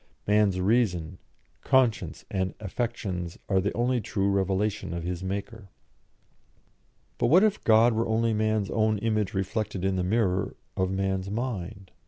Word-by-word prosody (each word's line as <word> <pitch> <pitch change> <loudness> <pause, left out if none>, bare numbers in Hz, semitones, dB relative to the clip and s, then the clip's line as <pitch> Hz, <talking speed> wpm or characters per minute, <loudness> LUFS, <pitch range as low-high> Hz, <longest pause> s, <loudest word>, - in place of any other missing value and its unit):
Man's 105 -2 +3
reason, 95 -5 +1 0.4
conscience, 130 -4 +1
and 95 -1 -1
affections 95 -4 -4
are 95 -2 +2
the 100 - -1
only 120 +1 +1
true 100 -1 0
revelation 95 -1 -1
of 85 - -4
his 90 +1 -4
Maker." 100 +2 -5 1.5
But - - +2
what 175 - +6
if 215 -1 +1
God 115 +1 +5
were 115 +1 0
only 115 0 +1
man's 110 -2 0
own 110 -1 +2
image 105 -2 -1
reflected 95 0 -2
in 95 -1 +1
the 90 - 0
mirror 95 -1 0 0.2
of 95 0 0
man's 95 0 -1
mind? 100 -4 -4
100 Hz, 145 wpm, -27 LUFS, 95-115 Hz, 1.5 s, what